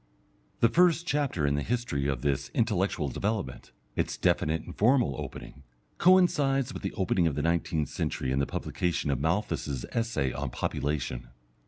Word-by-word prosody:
The 115 - +7
first 175 +4 +3
chapter 140 - 0
in 70 - +2
the 70 - 0
history 115 - -1
of 65 -2 -2
this 70 -3 0
intellectual 100 -8 +1
development, 95 - -3 0.2
its - - -1
definite 80 +1 +1
and - - -10
formal 120 - +3
opening, 70 0 -8 0.4
coincides 145 -8 +4
with - - -6
the 95 - -3
opening 90 -2 +1
of 75 - -1
the 75 - -1
nineteenth 80 -3 0
century 65 - -2
and 65 +1 +1
the 70 - 0
publication 85 -4 -1
of 65 - 0
Malthus's 80 - -1
Essay 95 - -1
on 70 0 -3
Population. 65 -1 -2
85 Hz, 160 wpm, -28 LUFS, 70-115 Hz, 0.4 s, The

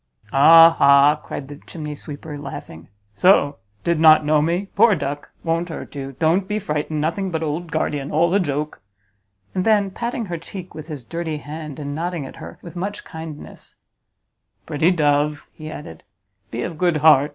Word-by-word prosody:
"Ah 165 +4 +8
ha!" 140 +1 +6
cried 135 - -7
the 145 0 -9
chimney 150 0 -7
sweeper, 150 +1 -8
laughing, 135 - -9 0.3
"so 145 - +4 0.3
did 170 -2 +1
not 155 -1 +7
know 150 0 +3
me? 170 +5 0
Poor 215 0 +5
duck! 145 -2 -4
won't 165 +1 -1
hurt 160 - -7
you; 135 -1 -6
don't 165 +7 +1
be 210 - -1
frightened; 150 -4 -2
nothing 170 +6 -1
but 165 -2 -2
old 160 +2 -3
guardian; 145 -3 -2
all 170 +3 +2
a 200 - +4
joke!" 150 -3 -3 0.7
And 185 - 0
then, 205 -2 +2
patting 235 +3 -3
her 175 -3 -5
cheek 180 +2 -9
with 155 0 -9
his 145 -7 -7
dirty 165 -1 -4
hand, 150 0 -8
and 145 -1 -5
nodding 165 -1 -3
at - - -11
her - - -10
with 170 -1 -10
much 200 +4 -4
kindness, 160 -2 -10 0.9
"Pretty 155 +4 +2
dove," 150 -3 +1
he 155 -1 -9
added, 145 - -9 0.5
"be 120 +1 -4
of 165 -3 -6
good 175 -3 +2
heart! 150 -2 +5
155 Hz, 175 wpm, -21 LUFS, 145-175 Hz, 0.9 s, Ah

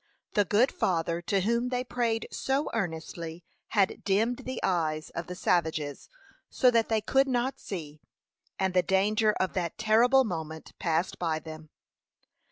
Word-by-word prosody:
The 205 - +3
good 220 +8 +3
Father 170 -1 0
to 195 +2 0
whom 235 +5 +1
they 250 0 -1
prayed 235 -2 -1
so 270 +2 -1
earnestly 165 -4 -4 0.2
had 200 -4 +1
dimmed 220 +5 +1
the 260 -1 -4
eyes 155 -4 0
of 170 0 -5
the 180 - -6
savages 160 -5 -1 0.4
so 250 - +4
that 230 -2 +2
they 220 -1 +2
could 270 +5 +3
not 260 +1 -1
see, 155 -6 -7 0.6
and 190 -1 0
the 180 - +5
danger 210 +4 +2
of 185 - -1
that 175 -3 -2
terrible 235 +5 +5
moment 160 -6 -5
passed 170 0 0
by 165 -3 0
them. 155 0 -9
190 Hz, 155 wpm, -28 LUFS, 165-235 Hz, 0.6 s, the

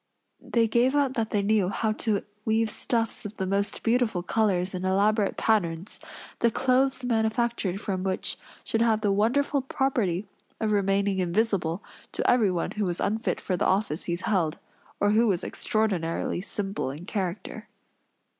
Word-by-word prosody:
They 230 -1 +1
gave 240 +5 +2
out 280 -3 +2
that 225 -3 -1
they 205 -1 0
knew 205 -3 +2
how 220 +2 0
to 215 -2 0 0.2
weave 220 0 +1
stuffs 230 0 0
of 210 +1 -7
the 190 - -2
most 200 +2 -1
beautiful 230 -6 +1
colors 190 -3 +1
and 185 0 -4
elaborate 200 +2 +2
patterns, 180 -4 0 0.4
the 235 - +4
clothes 260 +2 +1
manufactured 225 -4 0
from 190 -3 -3
which 190 0 -1 0.3
should 225 - 0
have 225 -2 +3
the 205 -2 +2
wonderful 270 +8 +2
property 235 -9 0 0.3
of 220 -1 0
remaining 195 -1 +1
invisible 185 -1 0 0.3
to - - -1
everyone 200 -8 +2
who 210 -1 -1
was 175 -1 -2
unfit 220 +2 -1
for 185 - -1
the - - +1
office 190 -5 0
he 170 - -1
held, 180 -5 0 0.4
or 205 - +3
who 225 +2 +4
was 185 -5 +1
extraordinarily 185 -6 -1
simple 195 -4 -3
in 150 +6 -7
character. 190 -2 -4
210 Hz, 155 wpm, -27 LUFS, 185-225 Hz, 0.4 s, the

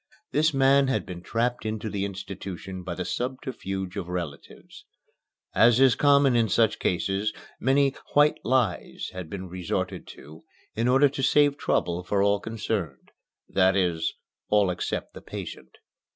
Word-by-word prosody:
This 155 +2 +3
man 135 0 +4
had 135 - 0
been 90 -1 -7
trapped 120 +5 -1
into 110 0 -3
the 100 -2 -2
institution 95 -1 -7
by 90 - -5
the 90 - -4
subterfuge 105 -7 -4
of 95 -4 -4
relatives. 85 -6 -7 0.7
As 120 +1 +5
is 135 -2 +6
common 140 -3 +4
in 115 -2 +3
such 110 +2 +2
cases, 95 +4 0 0.3
many 135 +2 +3 0.2
"white" 145 +1 +5
lies 120 -7 -1
had 90 -3 -7
been 95 0 -6
resorted 90 -1 -3
to 80 +2 -13 0.3
in 115 +2 0
order 135 +3 +5
to 140 0 -5
save 145 +1 +4
trouble 90 - -1
for 100 +2 +1
all 100 0 +3
concerned 100 - -4 0.4
that 95 0 +3
is, 85 -4 0 0.4
all 105 -3 +3
except 90 - -4
the - - -10
patient. 65 0 -8
100 Hz, 150 wpm, -26 LUFS, 90-130 Hz, 0.7 s, is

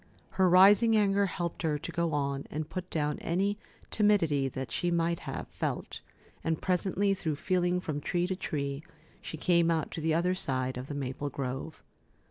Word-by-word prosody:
Her 190 -1 +3
rising 205 +5 +7
anger 200 -1 +3
helped 170 -1 -4
her 155 -3 0
to 155 - -6
go 170 -1 0
on 140 -1 -1
and 155 0 -4
put 185 +1 -6
down 150 -2 -1
any 195 +5 0 0.3
timidity 165 -10 +3
that 130 0 -5
she 175 - 0
might 170 0 +1
have - - -6
felt, - - -4 0.4
and 160 -1 0
presently, 190 +2 +1
through 160 -5 -2
feeling 180 +2 +1
from 155 -4 -4
tree 175 +4 0
to 185 +1 -2
tree, 140 -5 -3 0.4
she 160 - -7
came 170 +1 +3
out 160 -2 0
to 165 - -5
the 160 0 +1
other 180 +2 +2
side 130 -7 -1
of 125 +1 -6
the 145 - -5
maple 140 +1 -3
grove. 135 +3 -5
165 Hz, 180 wpm, -30 LUFS, 145-185 Hz, 0.4 s, rising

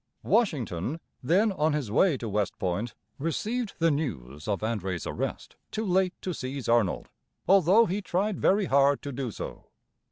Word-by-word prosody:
Washington, 145 - 0 0.2
then 190 - +3
on 155 -4 +1
his 140 -8 -2
way 160 - +4
to 120 - -5
West 105 -1 -1
Point, 100 +5 -2 0.2
received 215 - -2
the 165 0 +3
news 75 - -4
of 100 -2 -1
André's 95 -6 -2
arrest - - -4
too 220 - -3
late 185 -1 +2
to 185 - -2
seize 135 -2 -5
Arnold, 115 -6 +2 0.4
although 195 +4 +6
he 195 +2 -2
tried 195 +1 -1
very 200 +1 +3
hard 140 -2 +3
to 140 - -4
do 130 -1 -3
so. - - -7
145 Hz, 160 wpm, -28 LUFS, -, 0.4 s, although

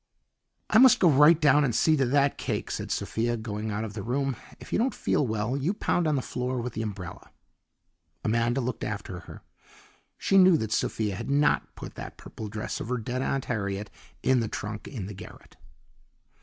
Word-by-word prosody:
"I 220 - +6
must 255 -1 +8
go 180 - +5
right 150 +4 +6
down 150 -1 +5
and 120 -5 0
see 160 - +4
to 135 -2 +2
that 140 +2 +2
cake," - - -3
said - - -4
Sophia, 120 +1 -1
going 110 -1 -4
out 105 +1 -2
of 110 -2 -6
the 105 - -5
room. 135 +4 -1 0.2
"If - - -10
you - - +2
don't 255 +4 +1
feel 140 - +1
well, 110 +3 -1
you 150 +9 -1
pound 175 -5 0
on 150 - +2
the 130 - -1
floor 125 0 -3
with 120 0 -4
the 110 - -3
umbrella." 100 -6 -6 0.9
Amanda 115 +4 +1
looked 125 -1 -3
after 100 -3 -4
her. 85 - -12 0.7
She 195 - +3
knew 185 -3 +7
that 110 -5 -3
Sophia 110 -1 0
had 115 +6 -6
not 145 +1 +2
put - - -8
that - - -8
purple 110 - -8
dress 105 +1 -4
of - - -6
her 125 - 0
dead 125 +3 -3
Aunt 135 0 -1
Harriet 100 -3 -3 0.3
in 130 -1 +4
the 115 - -1
trunk 105 0 -5
in 115 -9 -6
the 105 - -7
garret. 95 - -12
120 Hz, 200 wpm, -27 LUFS, 110-140 Hz, 0.9 s, must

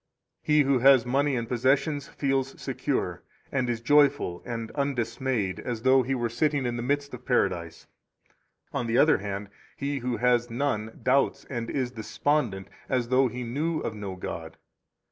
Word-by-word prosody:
7 150 - +4
He 150 - +7
who 135 -2 +2
has 130 -1 +6
money 140 +3 +1
and 115 -1 -2
possessions 135 +4 +1
feels 135 -1 -1
secure, - - -2 0.3
and 130 -3 0
is 115 -1 -2
joyful 145 -8 +3
and 115 -2 -4
undismayed 130 -7 -1
as 120 -2 -4
though 130 0 +5
he 130 +2 -1
were 120 -2 0
sitting 140 +4 0
in 120 -1 -1
the 120 - -3
midst 140 +3 -1
of - - -8
Paradise. 85 -2 0 0.9
8 - - -1
On 120 - -2
the 115 +1 +1
other 155 - +5
hand, 100 0 -5 0.3
he 140 0 -2
who 125 -1 -2
has 120 -1 +2
none 115 -3 -2
doubts 135 +1 +2
and 120 -3 -3
is 130 -3 -1
despondent, 115 -3 -1 0.2
as 125 -2 0
though 130 +1 +4
he 125 +1 -5
knew 155 +7 -1
of 110 - -3
no 100 -3 -6
God. 80 -3 -6
125 Hz, 175 wpm, -27 LUFS, 115-140 Hz, 0.9 s, He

